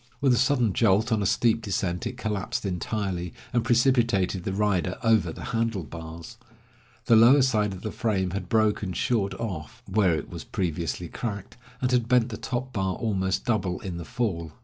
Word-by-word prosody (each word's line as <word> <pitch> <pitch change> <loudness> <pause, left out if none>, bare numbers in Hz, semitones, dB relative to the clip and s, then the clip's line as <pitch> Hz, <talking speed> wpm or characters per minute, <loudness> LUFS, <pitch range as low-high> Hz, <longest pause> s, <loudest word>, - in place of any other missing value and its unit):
With 135 -3 +3
a - - +3
sudden 125 -4 +2
jolt 110 +3 +3
on 110 -2 +2
a 100 - +1
steep 115 +2 +2
descent, 95 -4 -2
it 125 - -6
collapsed 105 -4 -3
entirely, 90 -1 -3 0.2
and 120 -1 +2
precipitated 120 -7 +2
the - - -1
rider 95 -3 0
over 110 -7 +3
the - - -9
handle 115 -5 0
bars. 80 +1 -9 0.7
The 115 - +5
lower 125 +5 +7
part 105 -5 +2
of 95 - -8
the 110 - -3
frame 95 -5 -1
had 95 -1 -4
broken 105 -3 +1
short 100 0 0
off, 90 -9 -6
where 95 -6 +3
it 75 - -4
was - - -8
previously 85 0 -3
cracked, 100 0 -5 0.3
and 125 - +2
had 120 -2 +2
bent 125 0 +3
the 110 - -5
top 125 +3 -4
bar 95 -2 -1
almost 95 -4 -1
double 100 -7 0
in 90 -3 -5
the 85 - -5
fall. 85 -7 -3
105 Hz, 185 wpm, -26 LUFS, 90-115 Hz, 0.7 s, lower